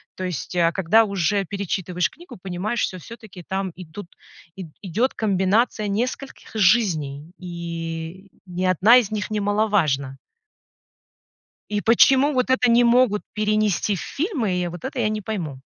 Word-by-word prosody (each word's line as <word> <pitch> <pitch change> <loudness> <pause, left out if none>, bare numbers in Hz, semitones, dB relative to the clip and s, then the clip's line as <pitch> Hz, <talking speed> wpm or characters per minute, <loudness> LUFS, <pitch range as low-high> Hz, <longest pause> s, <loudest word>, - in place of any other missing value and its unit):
То 185 - -6
есть, 180 0 -5
а 170 -1 +3
когда 195 +5 +3
уже 200 0 0
перечитываешь 185 -2 -2
книгу, 345 - -13
понимаешь, 195 +6 -3
что 185 - -2
всё-таки 215 -3 -12
там 190 -1 -2
идут, 180 +1 -10 0.5
и 190 -3 -7 0.2
идёт 220 +8 0
комбинация 210 +2 +1
нескольких 250 +6 -4
жизней, 175 -8 +1
и 170 +1 -6 0.2
ни 180 0 -3
одна 190 +7 +6
из 225 -5 +2
них 215 0 -3
немаловажна. 200 -11 0 1.5
И 210 -1 -2
почему 265 +5 +5
вот 255 -2 0
это 255 -2 +3
не 235 +1 +5
могут 235 -3 +3
перенести 215 -1 +1
в 185 - -5
фильмы, 280 - -2
и 180 -1 -1
вот 175 0 -9
это 265 -1 -4
я 215 -2 +1
не 215 - -3
пойму. 175 -11 -5
200 Hz, 145 wpm, -22 LUFS, 175-220 Hz, 1.5 s, одна